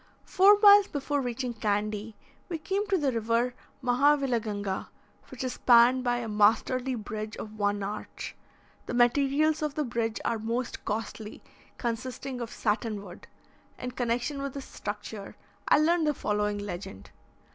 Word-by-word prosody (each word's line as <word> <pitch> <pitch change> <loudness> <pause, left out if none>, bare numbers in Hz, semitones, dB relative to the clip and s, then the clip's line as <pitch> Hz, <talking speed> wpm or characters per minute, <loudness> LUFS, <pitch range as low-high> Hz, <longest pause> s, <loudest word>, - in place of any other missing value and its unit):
Four 400 +2 +6
miles 405 -1 +8
before 285 0 -2
reaching 245 0 -3
Candy, 210 0 -2 0.3
we 340 - -2
came 390 +6 -2
to 395 -2 +2
the 290 -5 +1
river 230 +2 0 0.3
Mahavilaganga, 245 -7 +1 0.4
which 260 0 -6
is 255 - -2
spanned 245 +1 +5
by 245 -1 +1
a 240 -1 -4
masterly 225 +5 +2
bridge 215 -1 -6
of 215 0 -8
one 205 0 0
arch. 210 +2 -6 0.5
The - - -3
materials 280 +6 +3
of 300 -2 -2
the 305 - 0
bridge 230 -3 -2
are 230 - 0
most 230 +3 -3
costly, 220 0 -5 0.3
consisting 250 +2 -4
of 235 - -4
satin 215 -2 -2
wood. 180 -3 -12 0.5
In 250 - -5
connection 245 +4 -2
with 275 -1 -4
this 275 - -6
structure, 210 0 -7 0.3
I - - +6
learned 320 +1 +3
the 300 - +1
following 210 -2 -1
legend. 175 - -7
240 Hz, 145 wpm, -28 LUFS, 215-275 Hz, 0.5 s, miles